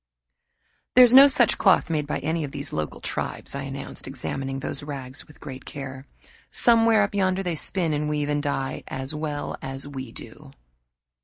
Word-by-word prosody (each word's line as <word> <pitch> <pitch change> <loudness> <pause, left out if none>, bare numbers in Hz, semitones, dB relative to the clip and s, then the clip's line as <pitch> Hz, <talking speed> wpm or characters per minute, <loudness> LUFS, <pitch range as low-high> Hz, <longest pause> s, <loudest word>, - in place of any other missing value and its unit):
"There 250 - +10
is 245 -1 +5
no 270 +2 +10
such 250 -5 +3
cloth - - +4
made 150 -2 -1
by - - -1
any 160 +3 -1
of 145 - -4
these 140 0 -4
local 75 -1 -4
tribes," - - -4
I 140 - -4
announced, 135 0 -7
examining 135 +1 -4
those - - -2
rags 135 -2 -8
with 150 - -18
great 135 -3 -9
care. 135 -1 -8 0.4
"Somewhere 225 -2 +4
up 200 - -2
yonder 190 -1 +1
they 175 -2 -1
spin 165 +1 +1
and 150 0 -1
weave 150 -1 -1
and 145 0 0
dye 140 -2 -2
as 135 +2 -3
well 150 -1 -4
as 135 +1 -5
we 130 -4 -7
do." 135 +5 -12
145 Hz, 180 wpm, -25 LUFS, 135-170 Hz, 0.4 s, There